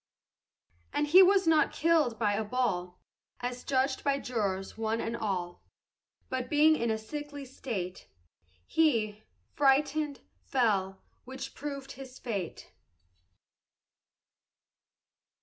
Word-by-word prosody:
And - - +1
he 345 +6 +8
was 385 0 +5
not 320 -1 +4
killed 310 -8 +2
by 210 -2 +1
a 215 +2 0
ball, 195 -7 -1 0.4
As 245 0 -4
judged 265 0 0
by 280 -1 +2
jurors 200 -8 -2
one 225 0 -1
and 230 +1 -2
all; 185 -6 -3 0.7
But 255 -1 -3
being 310 +1 +5
in 235 -5 -1
a 220 - +1
sickly 290 +5 -7
state, 210 -8 -5 0.6
He, 225 -10 +1 0.3
frightened, 285 +1 +2 0.2
fell, 195 -7 0 0.2
which 260 +1 -7
proved 280 -1 -6
his 260 -1 -10
fate. 200 -8 -5
250 Hz, 110 wpm, -30 LUFS, 215-290 Hz, 0.7 s, he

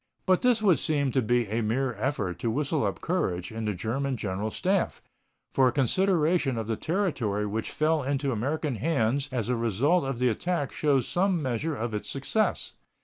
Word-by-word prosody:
But 185 -1 +3
this 240 -3 +3
would 190 -6 +4
seem 145 -3 0
to 130 - +2
be 120 +1 +2
a 110 +3 -1
mere 125 +4 0
effort 105 -5 -2
to 115 - -1
whistle 145 +4 0
up 100 - -4
courage 95 - -1
in 110 0 -4
the 105 -2 -1
German 130 +7 -2
General 100 +1 -2
Staff, 185 - 0 0.5
for 130 -1 +4
a - - +3
consideration 155 - +2
of 115 - -2
the 110 +1 -1
territory 130 - -1
which 110 +2 -3
fell 155 0 +1
into 140 0 -1
American 135 +3 -1
hands 140 +1 0
as 120 -4 -1
a 125 - +1
result 120 - +2
of 135 -2 -2
the 125 +1 +2
attack 155 +4 -1
shows 140 -5 +1
some 185 0 +1
measure 145 +3 -2
of 120 -3 -3
its 105 - -4
success. 145 +11 -1
135 Hz, 190 wpm, -27 LUFS, 115-155 Hz, 0.5 s, would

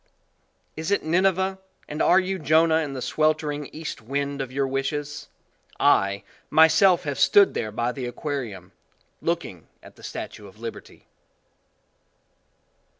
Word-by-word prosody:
Is 160 +2 -4
it 200 - +1
Nineveh 190 +3 +1 0.3
and 150 - -4
are 185 - +5
you 190 0 -2
Jonah 160 +2 +4
in 150 -4 -2
the 130 - -5
sweltering 150 -2 0
east 155 -6 -7
wind 140 +4 -3
of 130 -2 -5
your 135 +1 0
wishes? 145 +2 -3 0.5
I, 100 +1 +3 0.3
myself 160 +3 +5
have 145 -2 -3
stood 200 -1 +5
there 110 -2 -3
by 120 +3 -1
the 125 -1 -5
aquarium, 120 - -5 0.5
looking - - -3 0.2
at - - -15
the - - -17
Statue 105 -2 -7
of 100 +2 -17
Liberty. 115 0 -9
145 Hz, 135 wpm, -24 LUFS, 130-160 Hz, 0.5 s, are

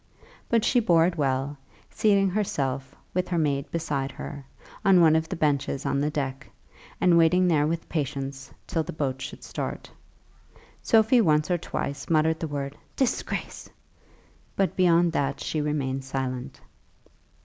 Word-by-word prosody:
But 230 -1 +2
she 250 - +4
bore 170 -8 +4
it 175 0 0
well, 135 -1 -1 0.3
seating 200 -3 +3
herself, 140 -10 -2 0.2
with 180 0 0
her 175 - -1
maid 140 -3 0
beside 145 -5 -2
her, 140 -1 -8 0.4
on 195 -3 +6
one 160 -2 +6
of 160 0 0
the - - -3
benches 140 -3 0
on 140 - 0
the 150 - +1
deck, 140 -2 -4 0.5
and 175 -2 +5
waiting 180 +3 +4
there 150 -4 +3
with 165 +1 -3
patience 135 -2 -4
till 165 - -1
the 155 - -6
boat 135 -3 -2
should - - -7
start. - - -5 0.9
Sophie 225 +2 +4
once 150 -4 +2
or 175 - +2
twice 140 -2 -4
muttered 160 0 +2
the 165 - -3
word 140 -1 -4 0.2
"disgrace!" 265 -3 -2 0.9
but 195 -1 0
beyond 175 -2 +4
that 140 -3 -1
she 155 - -2
remained 135 -3 -2
silent. 130 -2 -4
155 Hz, 150 wpm, -26 LUFS, 140-175 Hz, 0.9 s, on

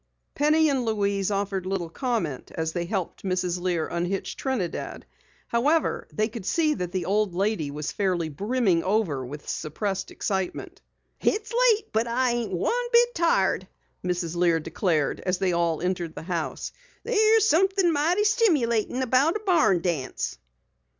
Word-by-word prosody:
Penny 310 +2 +3
and 270 -4 +1
Louise 200 -3 0
offered 195 -2 -2
little 190 -3 -2
comment 200 - -2
as 160 0 -2
they 175 -1 -2
helped 185 -1 -3
Mrs. 180 -2 -1
Lear 175 -3 0
unhitch 175 +3 -2
Trinidad. 245 -11 -3 0.4
However, 295 +8 +1
they 215 0 0
could 225 -2 -8
see 315 -2 +2
that 180 - -4
the 185 -2 -2
old 200 -1 +1
lady 195 -6 0
was 150 +1 -4
fairly 185 -5 0
brimming 195 - +1
over 185 -9 0
with 145 +4 -8
suppressed 195 +5 -3
excitement. 190 -3 -3 0.4
"It's 435 +3 0
late, 460 -3 +3
but 225 +2 +1
I 250 +1 +1
ain't 240 -2 -2
one 475 - 0
bit 480 0 +5
tired," 195 - +1 0.4
Mrs. 175 -2 -2
Lear 170 -1 +3
declared 160 -2 0
as 185 0 -1
they 185 -1 0
all 170 -1 0
entered 175 -3 -2
the - - -7
house. 170 -2 -3 0.3
"There's 440 -1 +4
somethin' 380 0 +3
mighty 335 +7 +2
stimulatin' 280 - +2
about 260 - +3
a 430 - -2
barn 225 - +4
dance." 165 -7 -2
200 Hz, 150 wpm, -26 LUFS, 175-290 Hz, 0.4 s, bit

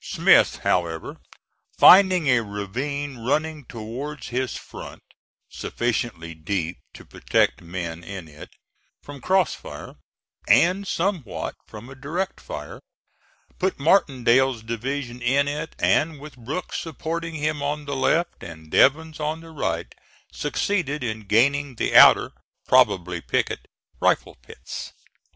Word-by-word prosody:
Smith, - - +4
however, 85 -3 -1 0.6
finding 185 -3 +7
a 125 -3 +4
ravine 125 +7 -4
running 150 +5 -1
towards 125 +6 -7
his 130 +1 -2
front, - - -10 0.4
sufficiently 110 -8 -3
deep 85 +2 -3
to - - -14
protect - - 0
men 85 -1 -6
in 95 -2 -8
it 75 0 -12 0.5
from 145 -2 -10
cross 190 +4 +2
fire, - - -9 0.5
and 190 +3 +4
somewhat 175 - -2
from 110 +2 -11
a 135 - -10
direct 165 +8 -4
fire, - - -8 0.8
put 190 0 0
Martindale's 130 - +3
division 120 +2 -4
in 135 +4 +2
it, 150 +2 -4
and 155 -2 +1
with 150 -1 -11
Brooks 135 +9 -5
supporting 165 +1 -5
him 150 -1 -2
on 145 +1 -2
the 140 0 -3
left 165 +6 0
and 80 -2 -11
Devens 155 +3 +3
on 155 +2 -2
the 165 0 -12
right 85 - -3 0.4
succeeded 150 -8 -1
in 110 -3 -4
gaining 140 +5 +2
the - - -1
outer - - +8 0.4
probably 95 -9 +3
picket - - -2 0.3
rifle - - +1
pits. - - -9
135 Hz, 125 wpm, -23 LUFS, 110-155 Hz, 0.8 s, outer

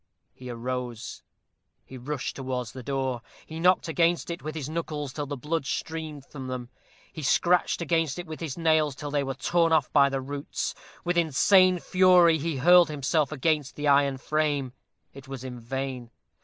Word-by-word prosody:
He 125 -1 -10
arose. 120 -1 -5 0.6
He 130 - -11
rushed 135 +2 -4
towards 130 -3 -4
the 130 - -9
door; 130 -2 -2 0.2
he 160 +1 -8
knocked 180 +1 +3
against 170 +2 +1
it 170 - -6
with 155 +1 -6
his 150 -4 -4
knuckles 150 -3 -4
till 145 -1 -4
the 145 0 -4
blood 150 +2 -2
streamed 155 -4 -4
from 135 -3 -8
them; 125 -1 -5 0.4
he 155 - -7
scratched 170 +4 +2
against 165 -2 0
it 175 - -5
with 155 -2 -8
his 160 -4 -5
nails 155 -4 +2
till 145 +1 -6
they 145 -1 +1
were 135 -1 -4
torn 165 +4 +1
off 155 -5 +2
by 140 -2 +5
the 135 0 -2
roots. 140 +2 -4 0.3
With 175 0 +1
insane 185 +4 +4
fury 180 -2 +5
he 160 -1 -2
hurled 175 +4 +6
himself 150 +1 0
against 150 -1 0
the 150 0 -2
iron 140 -1 +4
frame; 145 -3 -1 0.4
it 135 0 -12
was 135 -2 -7
in 125 -2 -7
vain. 130 0 -5
145 Hz, 180 wpm, -27 LUFS, 130-165 Hz, 0.6 s, hurled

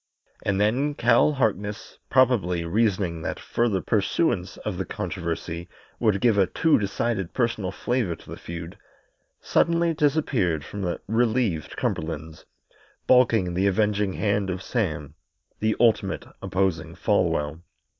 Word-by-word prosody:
And 100 -1 0
then 130 +8 +1
Cal 120 +5 +4
Harkness, 105 -5 -2
probably 105 -10 +3
reasoning 95 -3 0
that - - -4
further 115 -6 0
pursuance 100 - 0
of - - -3
the - - 0
controversy 85 0 -4 0.3
would 105 -4 +2
give 115 -4 +4
a 95 - +4
too 160 -5 +3
decided 100 -2 -2
personal 115 -7 0
flavour 115 -3 -1
to - - -17
the - - -5
feud, 85 0 -8 0.6
suddenly 170 0 +2
disappeared 135 - +1
from 100 - -6
the 90 -2 -2
relieved 110 -6 0
Cumberlands, 80 0 -3 0.6
baulking 115 -8 +4
the 95 +3 +2
avenging 105 0 +1
hand 100 -1 0
of 95 0 -3
Sam, 80 - -2 0.5
the 110 0 +1
ultimate 115 -2 +2 0.2
opposing 85 -4 -1
Folwell. 75 +2 0
100 Hz, 125 wpm, -25 LUFS, 90-120 Hz, 0.6 s, Cal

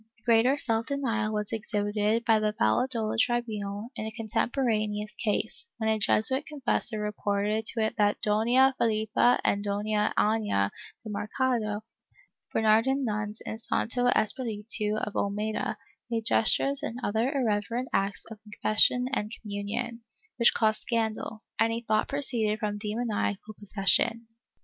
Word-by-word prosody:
Greater 240 +4 +4
self 230 -4 0
denial 230 -7 -1
was 210 -1 -2
exhibited 210 +1 -1
by 225 -2 +4
the 215 0 0
Valladolid 220 - +1
tribunal 220 -3 -1
in 215 - -4
a - - -5
contemporaneous 220 -2 -1
case, 220 - -2
when 220 -1 0
a 220 - 0
Jesuit 260 +7 +2
confessor 255 -6 0
reported 210 +1 -1
to 230 - 0
it 220 - -1
that 205 -1 +2
Dona 240 +6 +3
Felippa 220 +2 +2
and 200 0 +1
Doiia 210 +1 0
Aiia 210 - +1 0.3
de 220 - -8
Mer 210 +1 -4
cado, 225 -5 0 0.7
Bernardino 225 +5 +3
nuns 215 -4 -3
in 220 - -6
Santo 245 +2 0
Espiritu 215 -3 0
of 210 - -3
Olmeda, 210 +2 -2 0.3
made 225 -2 -2
gestures 275 +5 +4
and 250 -5 -4
other 225 +5 0
irreverent 235 -2 -1
acts 195 +1 -1
in 220 - -8
confession 220 +4 +3
and 210 -4 -1
communion, 220 +3 -4 0.4
which 235 - +4
caused 215 -1 +1
scandal, 220 -1 -2 0.2
and 225 0 +3
he 230 +1 -2
thought 215 0 +2
proceeded 240 -7 0
from 210 -2 -3
demoniacal 215 -1 -2
posses 195 -1 +2
sion. 230 0 +2
220 Hz, 140 wpm, -28 LUFS, 210-235 Hz, 0.7 s, Greater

